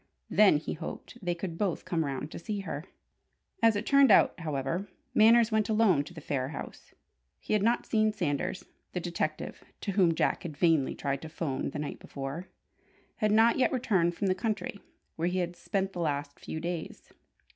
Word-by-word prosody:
Then, 210 Hz, -7 st, +6 dB
he 150 Hz, -, -4 dB
hoped, 170 Hz, +8 st, -8 dB
they 175 Hz, -1 st, 0 dB
could 170 Hz, -1 st, -5 dB
both 195 Hz, -5 st, -1 dB
come 165 Hz, -2 st, 0 dB
round 140 Hz, +1 st, -4 dB
to -, -, -6 dB
see 205 Hz, +3 st, -3 dB
her. 160 Hz, -4 st, -5 dB, 0.8 s
As 225 Hz, -1 st, +5 dB
it 205 Hz, +2 st, -2 dB
turned 280 Hz, -1 st, +6 dB
out, 205 Hz, -, +6 dB
however, 160 Hz, +4 st, -2 dB, 0.3 s
Manners 230 Hz, +1 st, +6 dB
went 215 Hz, -1 st, +1 dB
alone 215 Hz, -9 st, +4 dB
to 175 Hz, -, -11 dB
the 160 Hz, -, -8 dB
Phayre 135 Hz, -3 st, -1 dB
house. -, -, -9 dB, 0.4 s
He -, -, -3 dB
had 210 Hz, -, +3 dB
not 235 Hz, +3 st, +2 dB
seen 215 Hz, -1 st, +2 dB
Sanders. 175 Hz, -2 st, -2 dB, 0.3 s
The 180 Hz, -, -1 dB
detective 170 Hz, -3 st, -3 dB, 0.2 s
(to 200 Hz, -, -2 dB
whom 180 Hz, -4 st, +3 dB
Jack -, -, +1 dB
had 155 Hz, -4 st, -7 dB
vainly 160 Hz, -4 st, +3 dB
tried 140 Hz, -1 st, -2 dB
to 160 Hz, -, -7 dB
'phone 145 Hz, -5 st, -2 dB
the -, -, -6 dB
night 150 Hz, -1 st, -4 dB
before) 140 Hz, +6 st, -6 dB, 0.7 s
had 215 Hz, -2 st, +1 dB
not 225 Hz, +3 st, +5 dB
yet 255 Hz, -, +3 dB
returned 190 Hz, -9 st, +1 dB
from 200 Hz, -, -2 dB
the 185 Hz, -, +3 dB
country 205 Hz, 0 st, -3 dB, 0.4 s
where 165 Hz, +1 st, 0 dB
he 180 Hz, +1 st, -1 dB
had 175 Hz, -1 st, -1 dB
spent 195 Hz, +1 st, -2 dB
the 180 Hz, -, -5 dB
last 145 Hz, -3 st, -2 dB
few 160 Hz, -, -5 dB
days. 170 Hz, 0 st, -5 dB
175 Hz, 190 wpm, -30 LUFS, 155-210 Hz, 0.8 s, Then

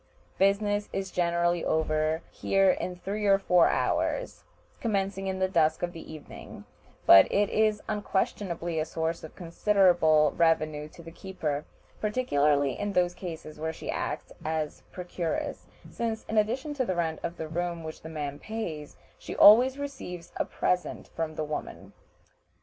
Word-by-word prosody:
Business 205 Hz, +1 st, +2 dB
is 195 Hz, -1 st, -3 dB
generally 175 Hz, 0 st, +1 dB
over 155 Hz, 0 st, 0 dB
here 195 Hz, -1 st, +3 dB
in 180 Hz, 0 st, -3 dB
three 205 Hz, +3 st, -3 dB
or 195 Hz, 0 st, +6 dB
four 180 Hz, -3 st, +4 dB
hours, -, -, -1 dB, 0.4 s
commencing 195 Hz, -3 st, -1 dB
in 190 Hz, 0 st, -2 dB
the 190 Hz, 0 st, +1 dB
dusk 160 Hz, -4 st, +2 dB
of 175 Hz, 0 st, -2 dB
the 165 Hz, -, -10 dB
evening; 155 Hz, -2 st, -11 dB, 0.4 s
but 95 Hz, 0 st, +8 dB
it 205 Hz, 0 st, +2 dB
is 215 Hz, -1 st, +2 dB
unquestionably 190 Hz, -5 st, -2 dB
a -, -, +1 dB
source 160 Hz, +1 st, -3 dB
of 160 Hz, -, -10 dB
considerable 170 Hz, -4 st, +3 dB
revenue 155 Hz, -2 st, +1 dB
to 170 Hz, -, -14 dB
the 165 Hz, -, -10 dB
keeper, 160 Hz, -5 st, -4 dB, 0.3 s
particularly 145 Hz, -, +1 dB
in 205 Hz, 0 st, -2 dB
those 180 Hz, -1 st, +2 dB
cases 165 Hz, -4 st, -8 dB
where 160 Hz, +1 st, -2 dB
she -, -, -6 dB
acts -, -, -4 dB
as 155 Hz, -1 st, -3 dB
procuress, 175 Hz, -2 st, -4 dB, 0.2 s
since, 225 Hz, -1 st, -3 dB
in 220 Hz, -, -3 dB
addition 245 Hz, +8 st, 0 dB
to 275 Hz, -3 st, 0 dB
the 185 Hz, -7 st, -2 dB
rent 160 Hz, -2 st, -1 dB
of 170 Hz, -, -4 dB
the 160 Hz, -, -4 dB
room 170 Hz, +1 st, -3 dB
which 155 Hz, 0 st, -8 dB
the 160 Hz, -, -8 dB
man 145 Hz, -3 st, -5 dB
pays, 170 Hz, -10 st, -6 dB, 0.2 s
she -, -, -7 dB
always 250 Hz, +6 st, +7 dB
receives 265 Hz, -12 st, -7 dB
a -, -, 0 dB
present 180 Hz, 0 st, -2 dB
from 160 Hz, -1 st, -4 dB
the 155 Hz, -, -2 dB
woman. 150 Hz, 0 st, -6 dB
175 Hz, 155 wpm, -28 LUFS, 160-200 Hz, 0.4 s, but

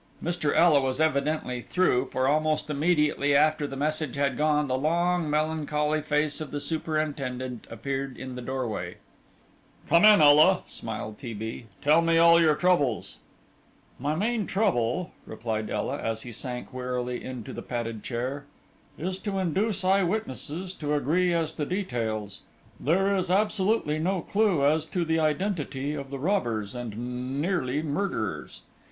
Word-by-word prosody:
Mr. 170 Hz, -3 st, 0 dB
Ela 160 Hz, -3 st, +5 dB
was 130 Hz, +1 st, -1 dB
evidently 145 Hz, -4 st, 0 dB
"through," 130 Hz, -5 st, +1 dB
for 130 Hz, 0 st, +1 dB
almost 155 Hz, +1 st, +1 dB
immediately 150 Hz, -2 st, +2 dB
after 150 Hz, 0 st, +3 dB
the 135 Hz, -, -7 dB
message 155 Hz, 0 st, -1 dB
had 140 Hz, -2 st, 0 dB
gone, 150 Hz, +1 st, +2 dB
the 130 Hz, -, 0 dB
long, 170 Hz, +3 st, +1 dB
melancholy 150 Hz, 0 st, 0 dB
face 150 Hz, 0 st, 0 dB
of 155 Hz, -, -5 dB
the 145 Hz, -, -4 dB
superintendent 145 Hz, -5 st, -3 dB
appeared 135 Hz, +3 st, -4 dB
in 130 Hz, 0 st, -7 dB
the 125 Hz, -, -6 dB
doorway. 120 Hz, -9 st, -4 dB, 0.9 s
"Come 170 Hz, +2 st, +5 dB
in, 215 Hz, -3 st, +8 dB
Ela," 155 Hz, +5 st, +6 dB
smiled 110 Hz, -1 st, -6 dB
T. 120 Hz, -5 st, -6 dB
B.; 110 Hz, +2 st, -6 dB, 0.2 s
"tell 155 Hz, +3 st, +5 dB
me 165 Hz, 0 st, +3 dB
all 170 Hz, 0 st, +7 dB
your 155 Hz, -2 st, +4 dB
troubles." 150 Hz, -9 st, +1 dB, 0.8 s
"My 145 Hz, +4 st, -1 dB
main 215 Hz, +4 st, 0 dB
trouble," 175 Hz, -, 0 dB, 0.2 s
replied 110 Hz, -1 st, -3 dB
Ela, 125 Hz, +7 st, -2 dB
as 115 Hz, 0 st, -2 dB
he 120 Hz, -, -8 dB
sank 125 Hz, +2 st, -5 dB
wearily 125 Hz, -1 st, -3 dB
into 125 Hz, -4 st, -7 dB
the -, -, -6 dB
padded 115 Hz, -3 st, -4 dB
chair, 130 Hz, +5 st, -4 dB, 0.5 s
"is 185 Hz, +3 st, -3 dB
to 200 Hz, -1 st, -3 dB
induce 190 Hz, +4 st, 0 dB
eyewitnesses 185 Hz, -3 st, -1 dB
to 150 Hz, -4 st, -2 dB
agree 170 Hz, +6 st, +2 dB
as 165 Hz, -2 st, 0 dB
to 150 Hz, -, -3 dB
details; 115 Hz, -, -3 dB, 0.4 s
there 195 Hz, +6 st, +2 dB
is 185 Hz, -2 st, -1 dB
absolutely 205 Hz, -4 st, +1 dB
no 180 Hz, +3 st, 0 dB
clue 200 Hz, -9 st, +2 dB
as 155 Hz, +2 st, +2 dB
to 175 Hz, +1 st, -1 dB
the 160 Hz, 0 st, +1 dB
identity 150 Hz, -3 st, -1 dB
of 140 Hz, -2 st, -6 dB
the 140 Hz, -, -5 dB
robbers, 120 Hz, -, -1 dB
and 125 Hz, +3 st, -5 dB
nearly 150 Hz, -4 st, 0 dB
murderers. 150 Hz, -, -3 dB
150 Hz, 150 wpm, -27 LUFS, 130-170 Hz, 0.9 s, in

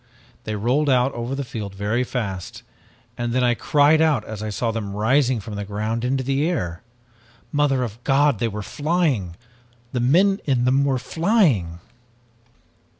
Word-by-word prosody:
They 110 Hz, -, -3 dB
rolled 125 Hz, +8 st, +1 dB
out 130 Hz, +1 st, +3 dB
over 120 Hz, +3 st, -4 dB
the 140 Hz, -, -3 dB
field 110 Hz, -6 st, -6 dB
very 105 Hz, +5 st, 0 dB
fast 100 Hz, -8 st, -5 dB, 0.6 s
and 120 Hz, 0 st, -2 dB
then 130 Hz, 0 st, +2 dB
I 120 Hz, -1 st, +3 dB
cried 145 Hz, +5 st, +3 dB
out 150 Hz, -9 st, +2 dB
as 110 Hz, -1 st, -7 dB
I 110 Hz, -, -3 dB
saw 115 Hz, +3 st, -1 dB
them 105 Hz, -3 st, -4 dB
rising 125 Hz, +3 st, +2 dB
from 105 Hz, +1 st, -8 dB
the 100 Hz, 0 st, -4 dB
ground 110 Hz, +3 st, -3 dB
into 130 Hz, +1 st, 0 dB
the 140 Hz, +5 st, 0 dB
air. 90 Hz, -, -3 dB, 0.7 s
Mother 145 Hz, -3 st, +2 dB
of 115 Hz, 0 st, -7 dB
God, 140 Hz, -3 st, +3 dB
they 115 Hz, -, +1 dB
were 105 Hz, -1 st, -5 dB
flying! 145 Hz, -, -1 dB, 0.6 s
The 125 Hz, -, -2 dB
men 185 Hz, -, +3 dB
in 130 Hz, -4 st, +1 dB
them 135 Hz, +2 st, +3 dB
were 135 Hz, -2 st, +1 dB
flying! 145 Hz, -, +1 dB
125 Hz, 165 wpm, -22 LUFS, 110-140 Hz, 0.7 s, out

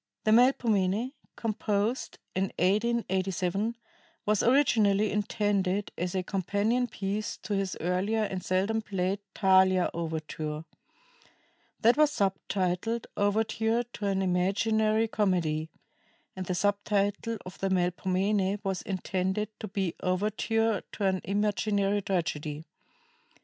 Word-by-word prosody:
The 215 Hz, -, +2 dB
"Melpomene," 225 Hz, -2 st, +3 dB, 0.2 s
composed 215 Hz, +1 st, -1 dB, 0.2 s
in 190 Hz, +1 st, +1 dB
1887, 195 Hz, 0 st, 0 dB, 0.5 s
was 210 Hz, -1 st, +2 dB
originally 220 Hz, -6 st, +3 dB
intended 205 Hz, -2 st, 0 dB
as 180 Hz, +1 st, -3 dB
a 185 Hz, -, 0 dB
companion 205 Hz, +6 st, 0 dB
piece 210 Hz, -1 st, -3 dB
to 210 Hz, -, -3 dB
his 195 Hz, -2 st, -1 dB
earlier 190 Hz, +6 st, 0 dB
and 190 Hz, -3 st, -3 dB
seldom 195 Hz, +5 st, +1 dB
played 195 Hz, -2 st, -1 dB, 0.2 s
"Thalia" 190 Hz, -2 st, +4 dB
overture. 155 Hz, -1 st, -4 dB, 1.2 s
That 235 Hz, +4 st, +5 dB
was 305 Hz, -1 st, +5 dB
subtitled 195 Hz, -1 st, -1 dB
"Overture 220 Hz, +3 st, +1 dB
to 235 Hz, -4 st, -5 dB
an 195 Hz, -1 st, +1 dB
Imaginary 215 Hz, +4 st, +2 dB
Comedy," 170 Hz, -7 st, 0 dB, 0.7 s
and 185 Hz, -1 st, -5 dB
the 180 Hz, -, -1 dB
sub 205 Hz, +2 st, +1 dB
title 205 Hz, +2 st, 0 dB
of 185 Hz, -, -9 dB
the 195 Hz, -, 0 dB
"Melpomene" 190 Hz, +2 st, +1 dB
was 190 Hz, -2 st, -2 dB
intended 190 Hz, +2 st, -2 dB
to 215 Hz, -, -5 dB
be 190 Hz, -3 st, -2 dB
"Overture 215 Hz, +3 st, 0 dB
to 205 Hz, -, -2 dB
an 190 Hz, -1 st, +1 dB
Imaginary 205 Hz, 0 st, +1 dB
Tragedy." 160 Hz, -5 st, -2 dB
200 Hz, 115 wpm, -29 LUFS, 185-215 Hz, 1.2 s, That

